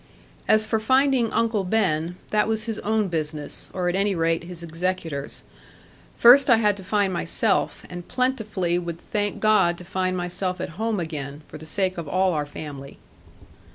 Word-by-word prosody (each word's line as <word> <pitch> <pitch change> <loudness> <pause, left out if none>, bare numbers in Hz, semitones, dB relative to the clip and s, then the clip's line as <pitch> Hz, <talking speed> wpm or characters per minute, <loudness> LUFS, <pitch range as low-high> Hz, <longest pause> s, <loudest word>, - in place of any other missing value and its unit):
As 215 0 +4
for 220 0 0
finding 260 0 +3
Uncle 225 -3 +1
Ben 180 -4 0
that 210 0 +2
was 220 -1 -1
his 225 -1 -4
own 215 -1 0
business, 155 -3 -4
or 180 -1 -2
at 175 - 0
any 195 0 +1
rate 165 0 0
his 175 -1 -8
executor's; 165 -4 -3 0.7
first 260 +4 +7
I 235 - +7
had 210 -2 +2
to 190 - -9
find 200 0 +1
myself, 185 +4 0
and 175 -1 -8
plentifully 215 -9 0
would 170 -1 -5
thank 205 -1 -2
God 210 -5 +3
to 180 - -11
find 185 0 -1
myself 180 +1 -2
at - - -3
home 220 +4 -2
again, 150 -3 -5
for 155 - -10
the 155 - -11
sake 185 +1 -1
of 165 - -6
all 185 +3 +2
our 150 -2 -1
family. 140 -2 -8
185 Hz, 175 wpm, -24 LUFS, 170-215 Hz, 0.7 s, first